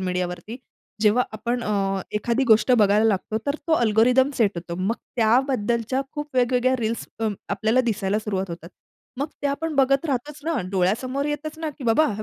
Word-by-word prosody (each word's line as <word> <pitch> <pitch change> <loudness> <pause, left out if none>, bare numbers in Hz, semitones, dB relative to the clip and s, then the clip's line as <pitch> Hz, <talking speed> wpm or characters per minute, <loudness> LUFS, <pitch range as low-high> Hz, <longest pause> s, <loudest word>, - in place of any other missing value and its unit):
मीडियावरती. 180 +3 -3 0.5
जेव्हा 215 +4 +4
आपण 240 +2 -2
अ, 195 -2 0 0.2
एखादी 235 +5 0
गोष्ट 220 +3 +5
बघायला 210 +1 +4
लागतो 215 0 0
तर 285 +2 0
तो - - +3
अल्गोरिदम 245 +3 +3
सेट 215 -4 +4
होतो. 170 0 -5
मग 200 +5 0 0.2
त्याबद्दलच्या 235 +1 +1
खूप 295 0 -5
वेगवेगळ्या 250 +1 +3
रील्स 230 +1 -2
अ, 220 - +1 0.2
आपल्याला 225 +4 +2
दिसायला 205 0 -1
सुरुवात 195 -3 -3
होतात. 170 0 -8 0.5
मग 290 - -1
ते - - +2
आपण 315 +2 -2
बघत 275 +3 +3
राहतोच 285 +2 -3
ना? 325 -7 0
डोळ्यासमोर 235 +9 0
येतच 300 +1 -4
ना 320 -1 -3
की 260 - -8
बाबा 270 +7 +4
हे 215 - -5
230 Hz, 170 wpm, -23 LUFS, 205-270 Hz, 0.5 s, गोष्ट